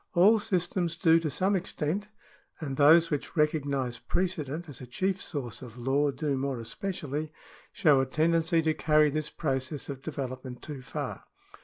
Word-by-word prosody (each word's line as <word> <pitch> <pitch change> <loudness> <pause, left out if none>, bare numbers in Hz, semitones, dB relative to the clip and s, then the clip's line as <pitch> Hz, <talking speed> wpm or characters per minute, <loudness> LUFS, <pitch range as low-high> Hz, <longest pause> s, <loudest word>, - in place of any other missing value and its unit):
All 205 +6 +6
systems 180 -4 0
do 165 -1 +5
to 160 -2 -2
some 190 +8 +1
extent, 185 +1 -2 0.5
and 140 -5 -4
those 160 +4 +6
which 150 +3 -3
recognise 140 -5 0
precedent 170 -3 -2
as 145 -4 -10
a 125 - -8
chief 190 +9 -1
source 130 -8 -5
of 125 -2 -10
law 135 +4 +1
do 140 +1 -1
more 135 -1 -2
especially, 150 - -4 0.4
show 145 -4 +4
a 135 - -1
tendency 165 +3 +2
to 160 0 +2
carry 150 -1 +3
this 155 +1 -2
process 135 -1 -3
of 135 -2 -5
development 130 -4 -6
too 145 -3 -7
far. - - -5
150 Hz, 160 wpm, -29 LUFS, 135-170 Hz, 0.5 s, All